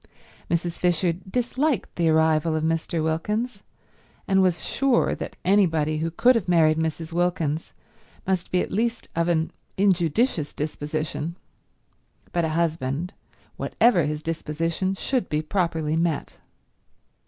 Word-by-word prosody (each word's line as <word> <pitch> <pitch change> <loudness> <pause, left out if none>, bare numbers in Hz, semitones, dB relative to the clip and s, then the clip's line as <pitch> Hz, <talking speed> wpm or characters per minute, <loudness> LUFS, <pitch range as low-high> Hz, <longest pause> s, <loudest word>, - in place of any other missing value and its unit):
Mrs. 170 0 -1
Fisher 175 -1 +2
disliked 245 - -1
the 170 -2 +2
arrival 160 0 +3
of 155 - -1
Mr. 165 0 0
Wilkins, 205 +8 -1 0.7
and 190 0 +4
was 180 -2 +1
sure 275 -3 +2
that - - -6
anybody 165 -6 +3
who 165 +1 -1
could 245 +10 +4
have 230 -7 -1
married 160 -3 +4
Mrs. 160 0 -3
Wilkins 165 -3 0 0.5
must 185 -2 -1
be 180 - +2
at - - -4
least 230 +3 -1
of 170 0 +1
an 165 -2 +1 0.3
injudicious 180 - +2
disposition, 150 +1 -3 1.0
but 170 - 0
a 160 - +1
husband, 160 0 -1 0.4
whatever 220 -9 +3
his 150 0 -3
disposition, 165 +3 -2
should 250 +1 -1
be 150 +1 0
properly 160 -3 0
met. 165 -2 -1
165 Hz, 130 wpm, -25 LUFS, 160-190 Hz, 1.0 s, and